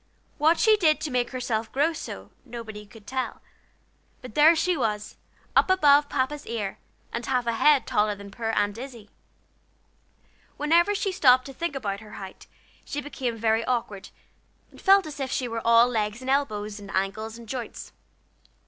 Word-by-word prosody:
What 320 +3 +4
she 435 -1 +5
did 315 -6 +3
to 300 - -3
make 245 -1 0
herself 230 -3 -3
grow 295 +5 +1
so, - - -8
nobody 220 -4 -9
could 215 0 -16
tell; 260 +2 -3 0.8
but 250 - -9
there 310 +5 +6
she 355 +2 +1
was 210 -6 -2 0.4
up - - +4
above 290 -5 +5
Papa's 285 +2 -2
ear, 210 -4 -4 0.3
and 235 - -3
half 250 -2 0
a 235 - 0
head 285 +4 +4
taller 210 0 +1
than 200 0 -11
poor 225 +1 -4
Aunt 205 0 0
Izzie. 240 -5 -10 1.5
Whenever 340 +7 +3
she 395 0 -1
stopped 255 -7 +5
to 270 - -8
think 335 0 -3
about 200 -7 -3
her 215 0 -13
height 190 -1 -10 0.4
she 290 - -4
became 260 -5 -4
very 225 0 +1
awkward, 230 -6 -3 0.6
and - - -16
felt 390 0 +5
as 300 -2 -8
if 270 -1 -2
she 255 -3 -1
were 230 -1 -4
all 230 +1 +6
legs 215 -2 -2
and 260 +1 -2
elbows, 215 -7 -1
and 200 -1 -11
angles 215 +4 -2
and 235 -1 -12
joints. 250 0 -6
245 Hz, 175 wpm, -26 LUFS, 215-290 Hz, 1.5 s, there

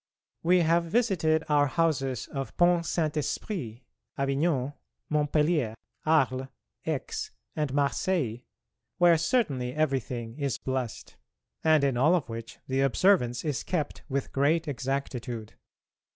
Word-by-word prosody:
We 180 +2 +4
have 170 +1 +3
visited 170 -6 +2
our 145 -1 +4
houses 135 -6 0
of 135 -2 -6
Pont 175 -1 +4
Saint 155 -3 0
Esprit, 140 - -3 0.3
Avignon, 140 0 0 0.4
Montpellier, 150 -4 +1 0.3
Arles, 135 -4 +2 0.4
Aix, 435 -1 -3 0.3
and 150 -4 -1
Marseilles, 140 -2 0 0.6
where 170 -2 +5
certainly 145 - 0
everything 130 -5 -1
is 140 -5 -1
blessed, 130 -3 -4 0.5
and 155 -2 +4
in 135 -3 +2
all 155 +8 +5
of 145 -9 -2
which 115 0 -7
the 135 +1 +1
observance 135 -3 +3
is 145 -4 -1
kept 155 -6 -2
with 135 -1 -2
great 155 +4 +2
exactitude. 125 -4 -3
145 Hz, 120 wpm, -28 LUFS, 130-165 Hz, 0.6 s, where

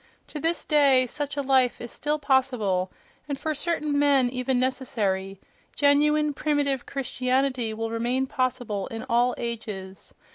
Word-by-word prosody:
To 300 - -6
this 330 +3 -1
day 280 -4 +4
such 290 +3 -4
a 285 - 0
life 260 -2 +2
is 240 - -7
still 300 +1 -1
possible, 250 -10 +1 0.4
and 280 -1 -3
for 310 +2 -1
certain 300 -2 -1
men 275 -4 +3
even 255 0 0
necessary: 210 -7 -1 0.4
genuine, 300 +1 +3
primitive 280 -3 0
Christianity 255 -2 -1
will 225 +1 -4
remain 240 +3 0
possible 250 -7 -2
in 225 +2 -6
all 245 0 +2
ages.... 210 -5 -6
260 Hz, 140 wpm, -25 LUFS, 235-285 Hz, 0.4 s, day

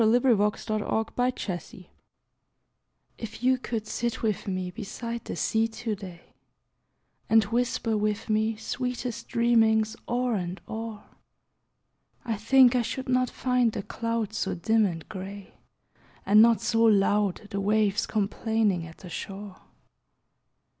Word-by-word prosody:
Paul - - +4
Laurence 210 -5 +2
Dunbar 215 0 0
Lounging 200 -7 -3 1.3
IF 225 +1 -7
YOU 255 0 +3
could 225 -3 -3
sit 235 +2 -3
with 215 -3 -1
me 185 -1 -2
beside 230 +3 -6
the - - -5
sea 225 0 +1
to 225 0 -4
day, 185 -4 -10 1.0
And 225 -1 +6
whisper 230 +1 0
with 210 +1 -1
me 220 0 +1
sweetest 250 +1 -4
dreamings 225 -2 +3
o'er 245 0 +1
and 180 -2 -3
o'er; 220 -1 -6 1.2
I 230 -2 -1
think 250 +4 +5
I 245 - +3
should 260 +3 -4
not 255 -1 +2
find 250 -3 +1
the 200 - -4
clouds 230 -1 -3
so - - -1
dim 220 +5 +2
and 165 -4 -6
gray, 195 +1 -8 0.7
And 210 +2 +7
not 230 0 +5
so 225 -1 +1
loud 205 -1 +2
the 200 - -2
waves 210 0 +2
complaining 210 -3 0
at 165 - -13
the 180 - -11
shore. 195 +3 -7
220 Hz, 135 wpm, -27 LUFS, 200-235 Hz, 1.3 s, And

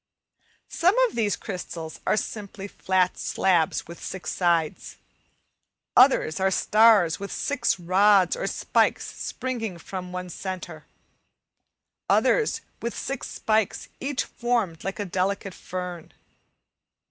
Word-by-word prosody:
Some 365 +7 +3
of 455 - -11
these 215 -3 +1
crystals 165 -5 -7
are - - +3
simply 205 -2 -5
flat 185 -2 0
slabs 175 -5 +1
with 170 +1 -11
six 190 - -5
sides, 170 -3 0 1.0
others 250 - +5
are 190 0 +3
stars 205 -4 +4
with 200 0 -6
six 255 -8 0
rods 190 +2 +4
or - - -3
spikes - - +1
springing 225 -8 -4
from 180 +1 -7
the 180 0 -5
centre, 185 +1 -6 1.2
others 450 -3 +3 0.2
with 235 - -4
six 275 -1 -4
spikes 220 -2 0
each 275 -1 -1
formed 235 -9 -2
like 195 - -4
a 205 - -3
delicate 190 +1 -1
fern. 180 -3 -6
195 Hz, 115 wpm, -25 LUFS, 180-225 Hz, 1.2 s, others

